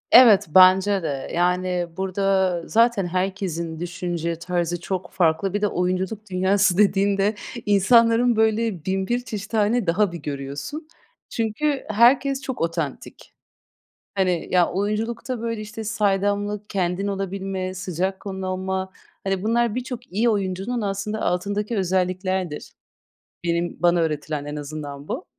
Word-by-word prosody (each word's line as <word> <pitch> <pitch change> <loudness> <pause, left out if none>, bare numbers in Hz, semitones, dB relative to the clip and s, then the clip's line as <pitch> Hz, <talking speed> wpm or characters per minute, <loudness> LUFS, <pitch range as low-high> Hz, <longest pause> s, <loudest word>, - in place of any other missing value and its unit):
Evet, 235 -6 +8
bence 190 +1 +6
de. 140 -4 -3
Yani, 180 0 +1
burada 190 -1 +1
zaten 230 -4 +3
herkesin 180 -3 -2
düşünce 175 -1 -3
tarzı 175 0 -1
çok 185 -1 -4
farklı. 175 +1 +1
Bir 205 - -1
de 210 - +3
oyunculuk 190 +3 -2
dünyası 190 0 +2
dediğinde 200 0 +3 0.3
insanların 230 +4 +4
böyle 220 -5 +1
bin 190 0 -1
bir 240 +1 +1
çeşit 210 -2 -6
hâlini 220 0 +2
daha 190 +3 +2
bir 170 - -5
görüyorsun. 145 - -5 0.4
Çünkü 260 +6 -1
herkes 260 +5 +4
çok 260 -3 -5
otantik. 165 -4 -4 0.8
Hani, 185 -4 0
ya, 180 -2 +4
oyunculukta, 225 +5 -2
böyle, 230 -1 -3
işte, 215 +1 -7
saydamlık, 205 -1 0
kendin 185 0 -1
olabilme, 195 -1 -3
sıcak 190 +1 -3
kanlı 190 -1 -5
olma, 190 0 -2 0.3
hani, 195 -1 -1
bunlar 230 +1 +1
birçok 250 -1 -6
iyi 220 +5 +2
oyuncunun 200 +3 -1
aslında 205 +1 -3
altındaki 205 +5 -1
özelliklerdir. 185 -2 -1 0.7
Benim 170 0 -1
bana 175 0 +4
öğretilen 150 -2 -2
en 145 0 -5
azından 145 -1 -7
bu. - - -4
190 Hz, 130 wpm, -23 LUFS, 175-215 Hz, 0.8 s, Evet